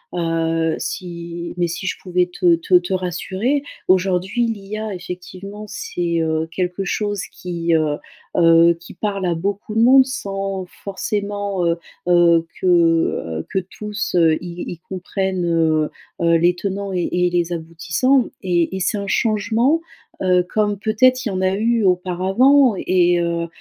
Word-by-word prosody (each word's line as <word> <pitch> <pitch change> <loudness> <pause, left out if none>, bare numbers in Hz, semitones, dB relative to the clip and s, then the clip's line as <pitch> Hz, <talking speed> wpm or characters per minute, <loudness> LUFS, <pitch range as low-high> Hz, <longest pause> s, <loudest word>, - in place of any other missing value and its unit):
Heu, 165 -1 0
si 170 -1 -5
mais 175 -1 +1
si 170 +3 -5
je 185 - -1
pouvais 180 -1 +1
te 175 -2 +4
te 165 +3 -5
te 175 +2 -4
rassurer 190 - -1 0.3
aujourd'hui 190 +5 +2
l'IA 215 -1 -4
effectivement 185 +4 -8
c'est 175 -3 -3
heu, 160 0 0
quelque 180 +2 -2
chose 205 0 -2
qui 170 -2 -2
heu 155 -2 +1 0.4
heu, 165 0 +6
qui 170 - -13
parle 200 -3 -2
à 170 - +1
beaucoup 200 +5 -3
de 225 - +3
monde 260 +2 +7
sans 195 -6 -4 0.2
forcément 200 -1 -2
heu 170 0 +1 0.3
heu, 170 -2 +5 0.2
que - - -4
heu 165 - +2
que 190 - +2
tous 205 +1 -5 0.3
y 175 0 -6
y 170 - -8
comprennent 185 0 -3
heu 160 -2 +2 0.3
heu, 170 0 +4
les 175 +2 +3
tenants 195 +2 -4
et 180 -2 -1
et 180 0 +2
les 175 0 0
aboutissants 170 +10 0
et 175 -1 0
et - - -3
c'est 200 +3 0
un 200 - -4
changement 225 +8 +2 0.4
heu, 180 -1 +4
comme 205 -2 0
peut-être 255 +5 +3
il - - 0
y - - -3
en 185 - -2
a 185 0 +2
eu 230 +2 +1
auparavant 195 +9 +3
et 175 -2 +2
heu 170 0 -1
185 Hz, 155 wpm, -20 LUFS, 170-205 Hz, 0.4 s, monde